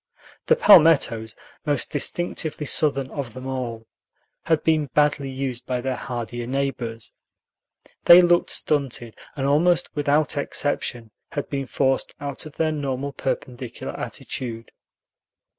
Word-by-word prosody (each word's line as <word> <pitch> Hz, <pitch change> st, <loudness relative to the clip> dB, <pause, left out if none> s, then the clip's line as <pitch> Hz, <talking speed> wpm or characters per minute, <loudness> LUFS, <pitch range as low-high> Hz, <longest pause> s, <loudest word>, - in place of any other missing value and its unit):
The 475 Hz, -, +6 dB
palmettos, 150 Hz, -, +5 dB, 0.3 s
most 145 Hz, -2 st, -1 dB
distinctively 155 Hz, 0 st, -2 dB
Southern 140 Hz, -2 st, +1 dB
of 130 Hz, -6 st, -5 dB
them 130 Hz, 0 st, -8 dB
all, 120 Hz, -4 st, -4 dB, 0.6 s
had 160 Hz, -2 st, +1 dB
been 155 Hz, -2 st, +2 dB
badly 145 Hz, -2 st, +2 dB
used 130 Hz, -2 st, -4 dB
by 125 Hz, -1 st, -1 dB
their 130 Hz, +1 st, -2 dB
hardier 120 Hz, -1 st, -5 dB
neighbors; 125 Hz, -4 st, -3 dB, 0.9 s
they 175 Hz, +1 st, +9 dB
looked 175 Hz, 0 st, +3 dB
stunted, 135 Hz, -6 st, -1 dB, 0.2 s
and 135 Hz, -2 st, -2 dB
almost 160 Hz, +6 st, +2 dB
without 145 Hz, +1 st, +1 dB
exception 125 Hz, -5 st, -2 dB, 0.2 s
had 145 Hz, -3 st, -3 dB
been 135 Hz, -2 st, -2 dB
forced 135 Hz, 0 st, 0 dB
out 140 Hz, +1 st, -5 dB
of 150 Hz, -, -13 dB
their 160 Hz, -1 st, +1 dB
normal 140 Hz, -2 st, -3 dB
perpendicular 125 Hz, -3 st, -5 dB
attitude. 115 Hz, -3 st, -6 dB
140 Hz, 125 wpm, -23 LUFS, 125-150 Hz, 0.9 s, they